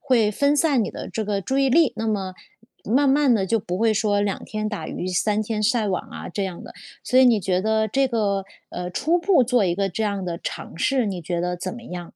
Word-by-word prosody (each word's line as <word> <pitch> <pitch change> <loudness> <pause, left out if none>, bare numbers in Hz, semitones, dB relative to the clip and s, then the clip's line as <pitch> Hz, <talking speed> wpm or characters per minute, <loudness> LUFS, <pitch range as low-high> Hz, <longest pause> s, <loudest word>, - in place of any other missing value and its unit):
会 235 -6 +2
分 280 +7 +2
散 280 -8 +2
你 - - -4
的 - - -7
这 220 - -3
个 200 -1 -1
注 265 +7 -2
意 270 -1 +3
力， 320 0 +4
那 225 0 -3
么 195 -4 -2 0.5
慢 275 +6 +2
慢 275 -1 +4
地 195 -3 0
就 225 +4 +1
不 180 -2 -4
会 225 -1 +2
说 205 -1 +1
两 200 -1 -2
天 215 0 -3
打 210 -1 -5
鱼 180 - -5
三 210 +4 +1
天 215 0 -3
晒 220 -1 +1
网 185 -2 -1
啊 - - -7
这 195 +3 -3
样 185 -2 -6
的。 - - -11 0.3
所 255 - +2
以 260 - +7
你 235 -4 +4
觉 185 0 0
得 220 +1 +1
这 270 +5 +2
个 200 -5 0 0.3
呃， 180 0 -5
初 325 - +1
步 345 -6 +4
做 245 -3 +2
一 175 -2 +1
个 195 +1 0
这 205 +5 -3
样 200 -2 -1
的 170 -1 -4
尝 - - -6
试， 260 +5 +1
你 185 -4 -4
觉 170 +1 -2
得 180 0 -2
怎 185 +1 -5
么 235 - -10
样？ 175 -1 -6
215 Hz, 270 characters per minute, -23 LUFS, 190-245 Hz, 0.5 s, 以